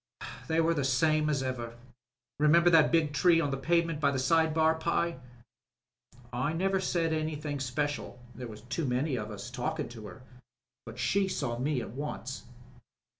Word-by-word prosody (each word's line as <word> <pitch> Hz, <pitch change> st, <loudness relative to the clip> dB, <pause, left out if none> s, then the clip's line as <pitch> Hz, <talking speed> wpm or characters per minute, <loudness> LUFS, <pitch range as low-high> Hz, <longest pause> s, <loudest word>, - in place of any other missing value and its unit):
They 160 Hz, 0 st, +1 dB
were 165 Hz, +1 st, +3 dB
the 145 Hz, -4 st, -1 dB
same 155 Hz, +4 st, +2 dB
as 140 Hz, -3 st, 0 dB
ever. 120 Hz, -3 st, -4 dB, 0.6 s
(Remember 170 Hz, +4 st, +5 dB
the 165 Hz, -1 st, +8 dB
big 155 Hz, -1 st, +2 dB
tree 170 Hz, +1 st, +4 dB
on 145 Hz, -4 st, 0 dB
the -, -, 0 dB
pavement 165 Hz, +2 st, +1 dB
by 145 Hz, -2 st, +3 dB
the 140 Hz, -, -1 dB
side 160 Hz, +5 st, +3 dB
bar, 160 Hz, 0 st, +3 dB
Pye 170 Hz, -1 st, -1 dB, 0.6 s
?) 120 Hz, 0 st, -27 dB
I 130 Hz, +6 st, -1 dB
never 190 Hz, +3 st, +1 dB
said 170 Hz, -3 st, 0 dB
anythih' 155 Hz, -1 st, -2 dB
in 145 Hz, -, -3 dB
special 145 Hz, +1 st, -3 dB, 0.2 s
(there 125 Hz, +2 st, -7 dB
was 110 Hz, -2 st, -10 dB
too 120 Hz, +7 st, -3 dB
many 130 Hz, +3 st, 0 dB
of 105 Hz, -3 st, -4 dB
us 105 Hz, -2 st, -7 dB
talkin' -, -, -3 dB
to 110 Hz, -3 st, -9 dB
her), 130 Hz, -, -12 dB, 0.6 s
but 115 Hz, +1 st, -9 dB
she 190 Hz, -, +1 dB
saw 135 Hz, -10 st, -2 dB
me 135 Hz, 0 st, 0 dB
at -, -, -7 dB
once." 135 Hz, -1 st, -6 dB
145 Hz, 180 wpm, -30 LUFS, 125-165 Hz, 0.6 s, the